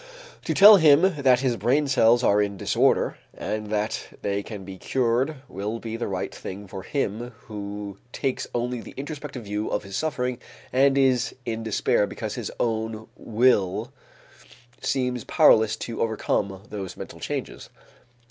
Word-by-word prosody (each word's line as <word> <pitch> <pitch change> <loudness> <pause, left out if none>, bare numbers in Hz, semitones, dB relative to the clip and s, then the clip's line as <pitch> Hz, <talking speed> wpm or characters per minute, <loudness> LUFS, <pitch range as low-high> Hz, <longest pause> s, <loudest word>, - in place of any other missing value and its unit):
To - - -1
tell 205 +1 +10
him 155 -2 +6 0.2
that 130 -2 +4
his 125 -3 0
brain 140 +4 +2
cells 120 -2 +4
are 105 -2 +4
in 100 -1 -2
disorder - - +2 0.2
and 105 0 -3
that 105 +1 -3
they 100 0 0
can 100 -2 -8
be 95 -1 -9
cured 130 - 0
will 105 +3 -4
be 115 -1 -6
the 115 - -3
right 95 -2 -3
thing 100 +2 -7
for 95 - -7
him 120 0 -3
who 100 -1 -7
takes 135 -2 -2
only 120 0 -1
the - - -12
introspective 145 -3 -6
view 105 +1 -3
of - - -1
his 100 -1 -7
suffering 125 -4 -1 0.3
and 135 +1 +4
is 130 -3 +2
in 115 -1 -3
despair 110 -2 +1
because - - -5
his - - -4
own 110 -1 -2
will 110 0 +1 0.9
seems 125 -3 -1
powerless 110 -1 +5
to 115 - -5
overcome 100 -3 -1
those 95 -3 -6
mental - - -8
changes. - - -5
115 Hz, 155 wpm, -25 LUFS, 105-130 Hz, 0.9 s, tell